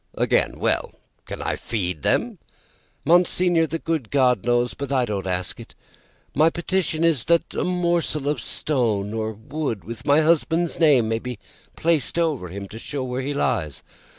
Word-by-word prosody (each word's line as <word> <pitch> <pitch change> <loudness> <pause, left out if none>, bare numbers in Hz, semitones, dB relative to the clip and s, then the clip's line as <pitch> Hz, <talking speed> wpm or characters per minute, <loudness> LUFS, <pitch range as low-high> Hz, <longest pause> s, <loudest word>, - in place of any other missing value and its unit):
"Again, - - +1
well? - - 0 0.3
Can - - -5
I - - -1
feed 90 -8 -3
them?" - - 0 0.7
"Monseigneur, 175 0 +3
the 165 +3 -2
good 160 -8 -2
God 125 -7 +3
knows; 120 0 +2
but 140 -1 -6
I 130 -3 +2
don't 100 -4 -3
ask 90 -1 -2
it. - - -12 0.6
My 155 +4 +4
petition 170 -1 -1
is, 165 -7 +2
that 170 0 +2
a - - -1
morsel 170 -5 0
of 145 -5 0
stone 110 -10 -1
or 110 0 -2
wood, 115 0 -4
with 115 0 -8
my 145 +2 +4
husband's 165 +1 +1
name, 140 -9 +5
may 115 0 0
be 125 -1 -6 0.4
placed 165 -2 +1
over 155 - 0
him 100 +3 -7
to 110 - -9
show 140 +3 -4
where 125 0 -3
he 140 +2 -3
lies. 90 - -1
135 Hz, 170 wpm, -23 LUFS, 110-165 Hz, 0.7 s, name